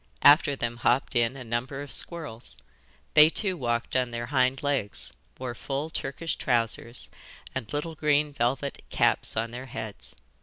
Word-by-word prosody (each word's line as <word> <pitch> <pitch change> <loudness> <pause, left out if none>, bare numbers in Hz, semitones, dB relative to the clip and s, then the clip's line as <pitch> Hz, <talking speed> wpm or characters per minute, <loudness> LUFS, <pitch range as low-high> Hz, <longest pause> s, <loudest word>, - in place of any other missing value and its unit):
After 145 -1 +7
them 120 -2 -3
hopped 125 +3 +2
in 120 +2 +2
a 130 - -7
number 125 +4 -3
of 145 - -10
squirrels. 120 - 0 0.6
They 150 +1 +9
too 190 +2 -1
walked 120 -6 -1
on 125 -1 +2
their 120 0 -4
hind 130 +1 +1
legs, 105 - -1 0.2
wore 125 -2 -4
full 140 +5 -4
Turkish 155 +3 -3
trousers, 115 -1 -1 0.4
and 115 -5 -4
little 150 +3 -2
green 150 -1 +2
velvet 135 +3 -1
caps - - +2
on 115 +1 0
their 125 +2 -7
heads. 110 -4 -6
130 Hz, 155 wpm, -27 LUFS, 120-145 Hz, 0.6 s, They